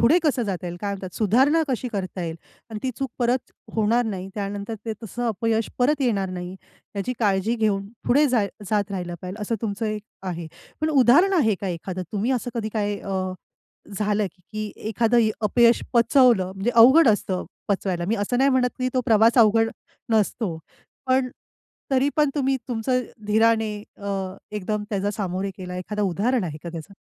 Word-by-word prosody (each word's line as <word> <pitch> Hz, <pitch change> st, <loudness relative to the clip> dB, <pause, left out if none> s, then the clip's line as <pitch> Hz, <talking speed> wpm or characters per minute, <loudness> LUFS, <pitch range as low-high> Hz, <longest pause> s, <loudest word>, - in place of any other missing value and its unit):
पुढे 285 Hz, +10 st, +5 dB
कसं 275 Hz, -6 st, +1 dB
जाता 185 Hz, -4 st, -3 dB
येईल 175 Hz, 0 st, -5 dB
काय 205 Hz, -1 st, -2 dB
म्हणतात 190 Hz, -2 st, -7 dB
सुधारणा 265 Hz, -, +3 dB
कशी 250 Hz, -1 st, -1 dB
करता 185 Hz, -2 st, -3 dB
येईल? 165 Hz, -1 st, -4 dB, 0.3 s
आणि 215 Hz, -, -4 dB
ती 260 Hz, -, 0 dB
चूक 270 Hz, -3 st, -2 dB
परत 245 Hz, +1 st, 0 dB, 0.2 s
होणार 225 Hz, +2 st, +2 dB
नाही 195 Hz, -3 st, -4 dB
त्यानंतर 200 Hz, +1 st, -4 dB
ते 225 Hz, -, -2 dB
तसं 240 Hz, +3 st, -4 dB
अपयश 225 Hz, +1 st, 0 dB
परत 285 Hz, +4 st, +2 dB
येणार 205 Hz, -7 st, +1 dB
नाही 180 Hz, +1 st, -6 dB, 0.4 s
याची 230 Hz, +6 st, -1 dB
काळजी 205 Hz, 0 st, +1 dB
घेऊन 200 Hz, -3 st, 0 dB, 0.2 s
पुढे 290 Hz, +4 st, +5 dB
जाय 225 Hz, -5 st, +2 dB, 0.2 s
जात 205 Hz, -2 st, +1 dB
राहिलं 175 Hz, -2 st, -4 dB
पाहिजे 185 Hz, +4 st, -6 dB
असं 230 Hz, -, -1 dB
तुमचं 220 Hz, +1 st, -2 dB
एक 215 Hz, -1 st, -3 dB, 0.2 s
आहे. 175 Hz, -3 st, -4 dB, 0.3 s
पण 310 Hz, -, +1 dB
उदाहरण 285 Hz, -, +5 dB
आहे 260 Hz, -, +3 dB
का 195 Hz, -, -2 dB
एखादं? 180 Hz, +1 st, -4 dB
तुम्ही 215 Hz, +4 st, 0 dB
असं 245 Hz, -1 st, -2 dB
कधी 225 Hz, -2 st, -2 dB
काय 205 Hz, -1 st, -1 dB
अ, 190 Hz, -1 st, -2 dB, 0.7 s
झालं 210 Hz, -1 st, +1 dB
की 215 Hz, +3 st, -6 dB
एखादं 225 Hz, +1 st, +2 dB, 0.2 s
अपयश 235 Hz, +2 st, +4 dB
पचवलं 235 Hz, -5 st, +4 dB
म्हणजे 195 Hz, +5 st, -1 dB
अवघड 265 Hz, +7 st, +8 dB
असतं 195 Hz, -3 st, 0 dB, 0.2 s
पचवायला. 190 Hz, -3 st, -1 dB
मी 220 Hz, -, +1 dB
असं 205 Hz, +4 st, -1 dB
नाही 270 Hz, +2 st, +4 dB
म्हणत 255 Hz, -2 st, +3 dB
की 255 Hz, 0 st, 0 dB
तो 255 Hz, -, +2 dB
प्रवास 225 Hz, +2 st, +5 dB
अवघड 225 Hz, 0 st, +5 dB, 0.4 s
नसतो. 215 Hz, -4 st, +1 dB, 0.5 s
पण 260 Hz, 0 st, +2 dB, 0.6 s
तरी 270 Hz, +2 st, +3 dB
पण 300 Hz, -2 st, +3 dB
तुम्ही 270 Hz, -2 st, +1 dB
तुमचं 250 Hz, +1 st, 0 dB, 0.3 s
धीराने 220 Hz, 0 st, +3 dB, 0.2 s
अ, 200 Hz, 0 st, -6 dB, 0.4 s
एकदम 210 Hz, 0 st, -2 dB
त्याचा 200 Hz, -1 st, -1 dB
सामोरे 195 Hz, -1 st, -2 dB
गेला 180 Hz, -1 st, -6 dB
एखादं 210 Hz, +3 st, -4 dB
उदाहरण 205 Hz, +6 st, +1 dB
आहे 155 Hz, -4 st, -4 dB
का 170 Hz, -, -5 dB
त्याचं? 165 Hz, +3 st, -8 dB
215 Hz, 175 wpm, -24 LUFS, 195-245 Hz, 0.7 s, अवघड